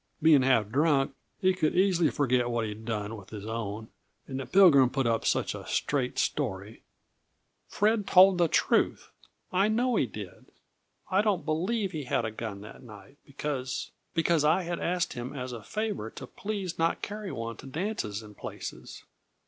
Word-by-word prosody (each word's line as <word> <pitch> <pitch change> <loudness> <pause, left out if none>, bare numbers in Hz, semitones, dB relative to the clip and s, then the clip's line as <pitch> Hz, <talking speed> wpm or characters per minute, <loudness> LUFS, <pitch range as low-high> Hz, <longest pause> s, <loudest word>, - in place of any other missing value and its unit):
Being 155 -3 +6
half 125 -5 +3
drunk, 140 +2 +2 0.3
he 185 -2 +3
could 165 -4 0
easy 180 -3 +3
forget 125 -3 +1
what 120 -1 0
he'd 110 +1 -7
done 110 -1 -3
with 100 -4 -12
his 105 -2 -8
own, 110 -1 -4 0.4
and 130 -1 -4
the 135 - -5
Pilgrim 160 -10 +6
put 135 0 -1
up 115 -1 +1
such - - +1
a - - -8
straight 130 -3 -1
story 105 -6 -2 0.4
" - - -48
"Fred 210 -1 +1
told 185 0 +7
the 170 - +4
truth. - - +1 0.4
I 195 +3 +3
know 235 +2 +1
he 130 - +2
did. 100 -4 -9 0.6
I 190 +2 +4
don't 205 -5 0
believe 190 +6 0
he 155 -5 -5
had 120 - 0
a 110 - -3
gun 110 -2 -6
that 105 - -11
night, 125 +3 -14
because 135 -2 -4 0.2
because 165 -2 +2
I 160 +5 +3
had 170 0 -3
asked 180 0 -1
him 125 +4 -6
as 125 -1 -5
a 120 -2 -7
favor 210 - -3
to - - -9
please 200 -5 -5
not 165 0 +1
carry 210 -2 -5
one 115 0 -5
to - - -11
dances 135 - -3
and 105 -1 -13
places. - - -8
140 Hz, 180 wpm, -28 LUFS, 115-185 Hz, 0.6 s, told